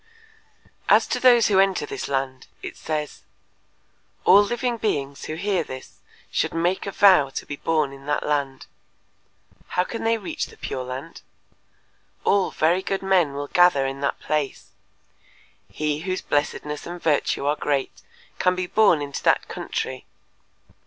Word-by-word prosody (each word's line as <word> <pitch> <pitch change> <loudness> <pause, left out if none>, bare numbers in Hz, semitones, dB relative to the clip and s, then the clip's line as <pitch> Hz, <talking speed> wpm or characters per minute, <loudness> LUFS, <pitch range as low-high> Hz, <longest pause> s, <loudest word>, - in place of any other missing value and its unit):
As - - +6
to - - -2
those 240 -3 +6
who 195 -2 +3
enter 195 -5 +2
this - - -5
land 135 -1 -3 0.2
it - - -6
says: 150 -1 -4 1.0
"All 200 - +8
living 240 +3 -1
beings 140 -11 -2
who 155 - -4
hear 190 0 0
this 130 -3 -10 0.3
should - - -1
make 175 +4 0
a - - -2
vow 185 -9 +5
to - - -6
be 145 - -5
born 155 -4 0
in 135 +1 -13
that 150 - 0
land. 140 -3 -1 1.1
How 180 - +4
can 230 +5 -6
they 225 0 +2
reach 315 +8 -4
the - - -16
Pure 130 -1 -4
Land? 130 +6 -7 1.0
All 200 -2 +3
very 170 +4 +2
good 195 0 -3
men 180 -7 +2
will 145 0 -3
gather 175 -4 +4
in 135 +1 -4
that 140 - -1
place… 150 -3 -3 1.0
He 150 -1 -2
whose 185 +3 -3
blessedness 150 0 -2
and 175 +1 -6
virtue 150 -3 0
are 145 +1 +2
great 140 -3 -2 0.4
can 180 0 +3
be 185 0 -2
born 180 -6 +3
into 140 -1 -5
that - - +2
country. - - -5
155 Hz, 155 wpm, -23 LUFS, 140-190 Hz, 1.1 s, All